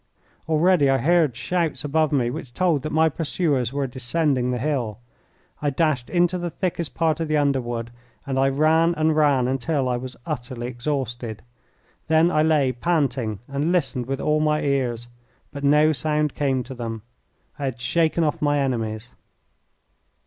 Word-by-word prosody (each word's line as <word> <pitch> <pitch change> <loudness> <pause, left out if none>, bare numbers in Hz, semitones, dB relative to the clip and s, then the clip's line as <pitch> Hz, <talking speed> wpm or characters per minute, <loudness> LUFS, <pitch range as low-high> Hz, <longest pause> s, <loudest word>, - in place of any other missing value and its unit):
Already 160 -2 +4
I 135 - +4
heard 155 -1 +2
shouts 155 +1 -1
above 155 +1 +1
me 125 -5 +1
which 135 -4 -8
told 170 -6 +2
that 155 - -4
my 160 +1 +4
pursuers 145 -5 -1
were 140 0 -1
descending 130 +1 -1
the 125 - -1
hill. 125 -6 -2 0.6
I 145 - +1
dashed 140 -3 0
into 175 0 +2
the 175 0 -3
thickest 170 -2 -3
part 160 -1 +1
of 165 - -2
the 155 0 +1
underwood, 120 -5 -1 0.3
and 135 -2 -1
I 135 0 +3
ran 160 +4 +3
and 155 0 +2
ran 145 -5 +3
until 135 +1 0
I 125 -1 0
was 130 +1 -7
utterly 125 -5 -5
exhausted. 120 -4 -4 0.6
Then 160 +2 +4
I 155 - +2
lay 155 -4 +3
panting 125 - -1
and 140 +4 -1
listened 135 -8 0
with 135 0 -2
all 150 0 +1
my 150 0 +1
ears, 125 -4 -1 0.5
but 140 0 -7
no 150 +2 +5
sound 150 0 0
came 135 -3 0
to 130 - -9
them. 115 -3 -5 0.6
I 140 - -2
had 130 -3 -3
shaken 165 +5 +1
off 150 - -1
my 145 -1 +2
enemies. 120 -4 -2
140 Hz, 165 wpm, -23 LUFS, 125-155 Hz, 0.6 s, no